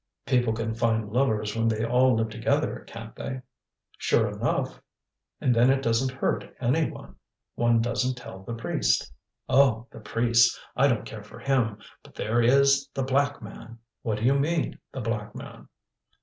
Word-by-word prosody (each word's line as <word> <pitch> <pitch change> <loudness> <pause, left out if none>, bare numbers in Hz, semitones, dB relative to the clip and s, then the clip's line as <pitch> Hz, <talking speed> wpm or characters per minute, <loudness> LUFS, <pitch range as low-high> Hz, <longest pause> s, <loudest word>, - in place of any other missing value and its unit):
"People 125 -3 +2
can 110 0 -2
find 110 -2 0
lovers 110 -5 +1
when 115 0 +1
they 110 0 0
all 125 +1 +4
live 110 0 0
together, - - -1
can't - - -9
they?" 130 -1 -6 0.6
"Sure - - +2
enough!" - - -2 0.6
"And 125 - +2
then 120 +2 +4
it 135 0 +2
doesn't 125 +2 0
hurt - - -2
any 140 +6 +1
one. - - -11 0.4
One 120 -1 +2
doesn't 125 +2 0
tell 110 -6 -10
the 115 +4 -6
priest." 65 - 0 0.3
"Oh! 125 -4 +4
the - - -11
priest! 115 +2 +3 0.2
I 140 - +4
don't 120 -5 0
care 110 -2 -8
for 105 - -13
him! 125 -6 0 0.2
But - - -18
there 115 +3 0
is 140 +3 +4
the 135 - 0
Black 140 0 0
Man." 115 +2 -10 0.2
"What 110 -2 -1
do 105 - -5
you 135 - +5
mean, 160 +3 -1
the 130 - -5
Black 105 -2 -3
Man?" - - -10
120 Hz, 170 wpm, -26 LUFS, 110-130 Hz, 0.6 s, you